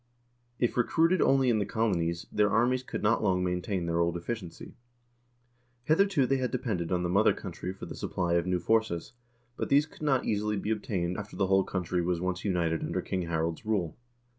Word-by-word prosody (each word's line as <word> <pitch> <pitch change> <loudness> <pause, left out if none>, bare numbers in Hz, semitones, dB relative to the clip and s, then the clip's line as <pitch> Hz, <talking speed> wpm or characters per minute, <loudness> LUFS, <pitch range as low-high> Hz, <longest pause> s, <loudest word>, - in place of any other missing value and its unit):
If 120 - 0
recruited 165 +8 +3
only 135 -2 +4
in 110 - +2
the - - +1
colonies, 85 -7 0
their 105 -1 +3
armies 125 +3 +2
could 130 - -6
not 110 +2 +3
long 95 -3 +1
maintain 90 0 -1
their 85 0 0
old 85 0 +1
efficiency. 90 -2 -6 1.1
Hitherto 165 -1 +3
they 135 +2 +1
had 130 -1 -1
depended 110 -10 -2
on 90 -1 +1
the - - 0
mother 100 +4 +4
country 90 - -6
for 95 - -9
the - - -7
supply 90 -2 -2
of 85 +1 +1
new 90 0 +1
forces, 110 -5 0 0.4
but - - -3
these 145 +2 +5
could 155 - -18
not 135 -4 +1
easily 105 0 0
be 105 +2 -2
obtained 95 -5 -2
after 105 0 -7
the 95 +1 +1
whole 95 0 +3
country 90 -1 -2
was 85 0 0
once 90 +1 -2
united 85 -5 0
under - - -2
King 90 -2 -3
Harald's 80 +1 -2
rule. 100 -7 -1
95 Hz, 195 wpm, -29 LUFS, 85-115 Hz, 1.1 s, these